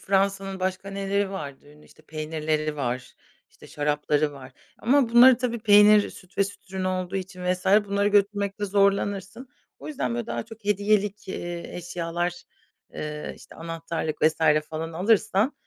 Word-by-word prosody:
Fransa’nın 195 0 0
başka 185 +1 -2
neleri 200 0 -1
vardı 145 -8 -7
ünlü? 150 0 -19
İşte, - - -21
peynirleri 155 -1 -2
var, 125 -2 -3 0.4
işte, - - -16
şarapları 150 0 0
var 135 -2 -12 0.3
ama 260 +1 +3
bunları 240 +2 +8
tabii 240 -1 -2
peynir 210 -1 +6
süt 185 -1 -16
ve 200 - +5
süt 195 -1 -11
ürün 190 -1 -2
olduğu 185 0 -2
için 185 -1 -6
vs. 180 +1 -6 0.2
bunları 200 0 +1
götürmekte 205 0 +1
zorlanırsın. 200 +3 0 0.3
O - - -9
yüzden, 125 - -2
böyle, 120 - -3
daha 120 0 -3
çok 225 -1 -14
hediyelik, 205 0 +1
eee, 175 -2 -5
eşyalar, 175 0 -3 0.5
eee, 150 0 -5
işte, - - -15
anahtarlık 165 -1 -4
vs. 155 +1 +4 0.3
falan 160 +1 -4
alırsan 200 - +2
190 Hz, 150 wpm, -25 LUFS, 160-205 Hz, 0.5 s, bunları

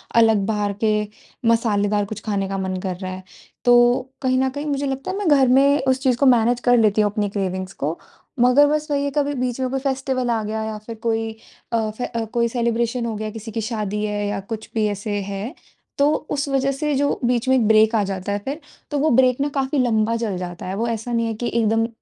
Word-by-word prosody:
अलग 225 -3 +4
बाहर 210 -2 0
के 215 -1 +3 0.6
मसालेदार 210 -3 +2
कुछ 205 0 -7
खाने 195 -3 -1
का 195 - -2
मन 190 -1 -2
कर 185 -2 -3
रहा 185 0 -5
है। 185 0 -7 0.4
तो 245 +2 +4
कहीं 255 -1 +2
न 265 0 +2
कहीं 285 +3 -5
मुझे 285 -1 -1
लगता 270 +6 -3
है 385 - -4
मैं 405 -4 -2
घर 275 -3 +5
में 275 +3 +4
उस 260 0 +3
चीज़ 255 -3 +2
को 280 - +2
मैनेज़ 245 -1 +4
कर 245 0 +5
लेती 215 -1 +3
हूँ 205 -1 +2
अपनी 205 -1 -1
क्रेविंग्स 190 -1 -3
को 155 +4 -3 0.4
मगर 250 +4 +6
बस 305 +1 0
वही 280 -1 +1
है - - 0
कभी 290 0 +1
बीच 250 -1 -2
में 255 - 0
कोई 270 +1 -1
फ़ेस्टिवल 265 -2 -1
आ 230 -2 +1
गया 220 +1 -3
या 220 -1 -4
फिर 230 - -6
कोई 225 -1 0 0.4
अ, 225 -2 +1
फे 245 - -2 0.3
कोई 235 -1 +2
सेलिब्रेशन 235 0 -1
हो 230 - -2
गया, 215 +1 -4
किसी 225 0 -8
की 225 - -3
शादी 210 -2 -3
है 205 0 -2
या 205 -1 -2
कुछ 215 +2 -7
भी 220 -1 +2
ऐसे 205 +1 -4
है। 200 +6 -5 0.4
तो 285 +1 +4 0.2
उस 285 0 -1
वज़ह 275 0 +1
से 295 +2 -1
जो 285 +1 0
बीच 245 +1 +1
में 260 - +5
एक 230 -4 +2
ब्रेक 220 +1 +5
आ 210 - +3
जाता 195 0 -4
है 205 - -1
फिर 285 +4 -3 0.3
तो 290 - 0
वो 310 +2 +2
ब्रेक 255 -1 +4
न 290 - +1
काफ़ी 275 0 -1
लंबा 230 -2 +2
चल 215 -5 -2
जाता 175 0 -6
है। 190 - -3
वो 230 +3 -1
ऐसा 230 +1 -3
नहीं 230 -1 +1
है 225 - -2
कि 235 +2 -3
एकदम 225 0 +2
230 Hz, 240 wpm, -21 LUFS, 210-260 Hz, 0.6 s, मगर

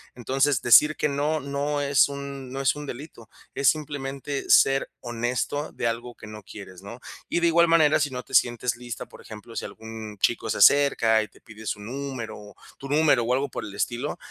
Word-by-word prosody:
Entonces 135 +3 0
decir 150 +6 +6
que 150 - +1
no, 145 +2 -1
no 145 +1 -2
es 140 0 +3
un 140 -2 -7
no 135 +1 -4
es 135 - +3
un 150 -1 -7
delito. 120 -4 -9 0.2
Es 140 -2 +3
simplemente 140 -2 -4
ser 135 0 +4
honesto 120 +5 -3
de - - -5
algo 120 +1 -4
que - - -12
no 110 0 -9
quieres, 95 -2 -11
¿no? 115 +5 -10 0.3
Y 170 - 0
de 170 - +3
igual 170 +1 +4
manera, 155 -2 +4
si 145 -1 0
no 125 -1 -6
te - - -17
sientes 120 0 +2
lista, 120 -1 -7
por - - -15
ejemplo, 110 +1 -11
si - - -3
algún 110 -1 -9
chico 115 -2 +1
se 100 - -1
cerca 115 -6 +5
y 110 - -5
te - - -23
pide 110 -1 -12
su 105 - -2
número, 115 -3 -7 0.2
tu 135 - -8
número 145 -4 +3
o 125 +2 0
algo 135 +1 0
por 120 - -6
el 100 -1 -9
estilo, 120 +4 -2
130 Hz, 205 wpm, -25 LUFS, 115-145 Hz, 0.3 s, decir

